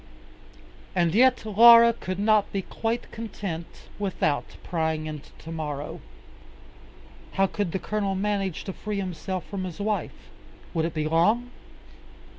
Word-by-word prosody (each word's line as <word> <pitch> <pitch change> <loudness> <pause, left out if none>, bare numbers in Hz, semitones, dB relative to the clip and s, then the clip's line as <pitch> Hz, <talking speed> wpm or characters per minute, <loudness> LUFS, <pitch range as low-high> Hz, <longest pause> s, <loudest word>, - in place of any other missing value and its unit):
And 170 -2 +2
yet 255 +1 +4
Laura 235 +2 +8
could 185 -5 -5
not 210 0 +3
be 195 -1 -2
quite 230 +4 -3
content 195 -7 -5 0.3
without 185 -7 -1
prying 160 -2 -1
into 155 -2 -7
tomorrow. 150 -3 -5 1.3
How 195 - +3
could 195 -2 -2
the 190 - -1
Colonel 200 0 -2
manage 195 -2 -1
to 190 - -5
free 210 +1 -4
himself 185 -1 -4
from 195 -2 -5
his 180 0 -6
wife? 210 0 -3 0.4
Would 165 -2 +1
it 165 0 -4
be 155 0 0
long? 210 +10 +2
195 Hz, 130 wpm, -26 LUFS, 165-215 Hz, 1.3 s, Laura